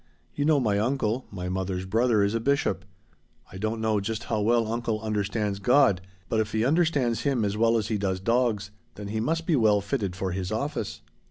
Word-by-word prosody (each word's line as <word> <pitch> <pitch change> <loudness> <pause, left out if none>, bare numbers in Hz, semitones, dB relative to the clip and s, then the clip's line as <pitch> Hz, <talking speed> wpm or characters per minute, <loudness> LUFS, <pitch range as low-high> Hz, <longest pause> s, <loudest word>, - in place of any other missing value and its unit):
You 145 - -1
know 155 -2 +4
my 105 -5 +1
uncle 120 0 -1
my 90 -3 -5
mother's 95 0 -2
brother 110 +2 +2
is 100 +1 +1
a 115 - 0
bishop. 140 - 0 0.7
I 95 - -8
don't 110 +2 -2
know 110 -1 +1
just 110 +3 -3
how 110 -2 -1
well 115 +2 +3
uncle 115 0 -2
understands 105 -1 -2
God, 120 -3 +4 0.3
but 110 - 0
if 110 - -1
he 110 +1 +1
understands 140 -7 +2
Him 130 -6 +1
as 100 0 -1
well 115 +1 +3
as 110 -2 -2
he 110 -2 0
does 95 -2 -1
dogs 110 -1 0 0.2
then 100 -1 -7
he 110 +1 -2
must 165 +8 -1
be 165 - +2
well 110 -5 +4
fitted 100 -2 -2
for 95 0 -2
his 95 +1 -3
office. 140 +7 -3
110 Hz, 205 wpm, -26 LUFS, 100-120 Hz, 0.7 s, know